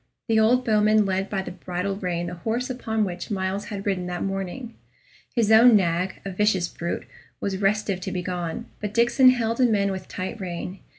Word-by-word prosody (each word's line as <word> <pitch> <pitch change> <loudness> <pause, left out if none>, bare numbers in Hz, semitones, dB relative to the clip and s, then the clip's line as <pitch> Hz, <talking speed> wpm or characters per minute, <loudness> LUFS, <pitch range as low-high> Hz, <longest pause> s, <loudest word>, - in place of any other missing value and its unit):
The 225 -2 +3
old 245 +3 +3
bowman 215 -1 +4
led 190 0 -1
by 195 -2 -2
the - - -6
bridle 180 +2 -3
rein 180 -3 -2
the 175 - -5
horse 230 +8 -2
upon 220 -3 -1
which 180 -3 -4
Myles 195 0 -2
had 200 -2 -6
ridden 185 -3 -1
that 175 0 -3
morning. 195 +5 -4 0.6
His 225 -3 +2
own 225 +1 +8
nag, 180 -1 0
a 195 - -3
vicious 190 -2 +1
brute, 170 0 -4 0.3
was 195 -1 -2
restive 200 -1 0
to 190 - -4
be 180 -1 -3
gone, 175 -3 -4
but 210 0 -5
Diccon 240 +3 +5
held 230 -2 +1
him 240 -4 +4
in 200 -1 +1
with 190 -1 -6
tight 190 +4 -5
rein. 180 +1 -5
195 Hz, 195 wpm, -24 LUFS, 180-220 Hz, 0.6 s, own